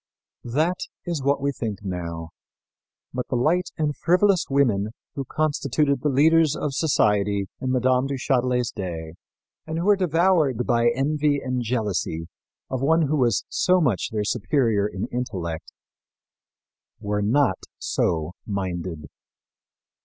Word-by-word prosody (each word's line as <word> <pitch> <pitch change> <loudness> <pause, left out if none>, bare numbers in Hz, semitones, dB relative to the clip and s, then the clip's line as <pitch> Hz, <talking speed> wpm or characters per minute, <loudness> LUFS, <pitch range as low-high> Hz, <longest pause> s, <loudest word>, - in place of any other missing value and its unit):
That 170 +5 +2 0.3
is 170 -5 -2
what 140 +1 +2
we 140 0 +1
think 110 -6 -5
now; 85 -3 -4 0.8
but 125 0 -3
the - - -1
light 165 +9 +2
and 150 -2 0
frivolous 180 +2 +3
women 115 -7 +2 0.2
who 140 - -3
constituted 145 -1 0
the 150 - +1
leaders 155 +2 +4
of 145 - -2
society 105 -9 +2
in 130 - -2
Mme. 130 +1 +2
du 140 - -2
Châtelet's 125 -2 +1
day, 80 -4 -5 0.5
and 160 0 -3
who 170 - -1
were 205 0 +6
devoured 165 - +2
by 120 -1 +3
envy 145 +3 +1
and 130 -2 -2
jealousy 105 -8 -2 0.4
of 130 -1 -3
one 160 +4 +3
who 150 +1 +1
was 120 -7 +2
so 185 0 +2
much 125 - +1
their 105 -1 -1
superior 115 -2 +1
in 95 -2 -4
intellect 90 -10 -4 1.3
were 105 -1 -1
not 115 -1 +2 0.2
so 80 -1 -1 0.2
minded. 90 -6 -4
125 Hz, 135 wpm, -24 LUFS, 105-150 Hz, 1.3 s, were